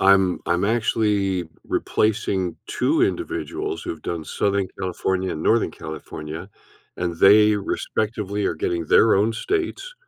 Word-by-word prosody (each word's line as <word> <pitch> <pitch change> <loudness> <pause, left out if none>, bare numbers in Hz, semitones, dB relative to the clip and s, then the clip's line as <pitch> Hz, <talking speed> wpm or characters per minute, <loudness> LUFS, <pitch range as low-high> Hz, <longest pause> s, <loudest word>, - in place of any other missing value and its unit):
I'm 95 -2 +4
I'm 85 +3 +1
actually 105 -4 +1 0.2
replacing 100 -4 0
2 325 +2 +1
individuals 360 +2 -2
who've 345 -2 -6
done 85 -2 -4
Southern 100 +3 0
California 95 0 -1
and 80 - -4
Northern 115 0 +3
California, 80 +3 -8 0.5
and 85 -1 -2
they 105 +4 +6
respectively 105 0 -2
are - - 0
getting 85 +1 -1
their 110 - +5
own 105 +4 +2
states, 405 - -3
100 Hz, 125 wpm, -23 LUFS, 90-115 Hz, 0.5 s, they